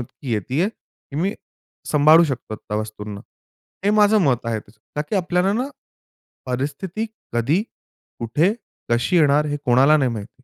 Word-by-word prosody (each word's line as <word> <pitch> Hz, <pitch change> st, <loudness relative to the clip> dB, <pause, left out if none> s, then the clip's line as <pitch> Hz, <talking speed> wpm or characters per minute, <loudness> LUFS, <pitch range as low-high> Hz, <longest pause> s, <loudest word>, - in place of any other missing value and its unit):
इतकी 120 Hz, +1 st, -7 dB
येत 105 Hz, -2 st, 0 dB
आहे 170 Hz, +9 st, +2 dB
की 150 Hz, -9 st, -15 dB
मी 195 Hz, +5 st, 0 dB, 0.6 s
सांभाळू 155 Hz, +3 st, +6 dB
शकतो 130 Hz, -7 st, -4 dB
त्या 105 Hz, 0 st, -5 dB
वस्तूंना. 105 Hz, -1 st, -5 dB, 0.6 s
हे 205 Hz, -, +4 dB
माझं 210 Hz, 0 st, +5 dB
मत 125 Hz, -6 st, +1 dB
आहे 115 Hz, -2 st, -1 dB
तसं. 105 Hz, +2 st, -22 dB, 0.2 s
कारण 150 Hz, -, -1 dB
की 210 Hz, -, +1 dB
आपल्याला 180 Hz, +1 st, +1 dB
ना 250 Hz, +6 st, -1 dB, 0.8 s
परिस्थिती 150 Hz, -, -3 dB, 0.3 s
कधी, 130 Hz, -, +1 dB, 0.6 s
कुठे, 150 Hz, -, +2 dB, 0.4 s
कशी 120 Hz, +9 st, +2 dB
येणार 150 Hz, -2 st, +4 dB
हे 145 Hz, 0 st, -1 dB
कोणाला 130 Hz, +5 st, +5 dB
नाही 135 Hz, -4 st, +1 dB
माहिती. 115 Hz, +4 st, -8 dB
145 Hz, 155 wpm, -22 LUFS, 120-180 Hz, 0.8 s, सांभाळू